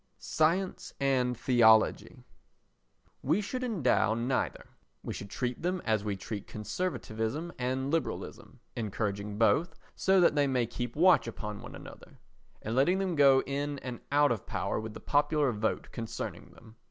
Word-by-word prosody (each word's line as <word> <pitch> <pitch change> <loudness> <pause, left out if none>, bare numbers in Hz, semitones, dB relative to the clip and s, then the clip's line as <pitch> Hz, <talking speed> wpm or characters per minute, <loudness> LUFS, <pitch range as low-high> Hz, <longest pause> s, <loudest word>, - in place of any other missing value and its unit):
Science 175 +5 0
and 130 -3 +1
Theology 110 -3 +3 1.0
We 155 +9 +1
should 255 +5 -3
endow 160 - +2
neither; 125 +3 -1 0.4
we - - -4
should 100 - -7
treat 125 +1 -3
them 180 +2 -1
as 110 -3 +1
we 105 -2 -2
treat 100 +1 -6
conservatism 115 - -3
and 130 +2 -1
liberalism, 165 -1 -4
encouraging 105 -2 -3
both, 115 - +2 0.2
so 190 0 +3
that 175 - +5
they 145 -1 +2
may 125 -3 +1
keep 120 +1 -5
watch 175 -3 +5
upon 105 -2 -6
one - - -9
another, - - -12 0.5
and 110 +2 -3
letting 170 +9 +3
them 190 -2 -1
go 140 -3 +5
in 145 +1 -2
and 125 -2 -5
out 145 -1 +4
of 115 -5 -3
power - - -2
with 110 0 -7
the - - -7
popular 145 -1 +2
vote 110 0 -2
concerning 115 -1 -6
them. 110 0 -17
130 Hz, 155 wpm, -30 LUFS, 110-155 Hz, 1.0 s, that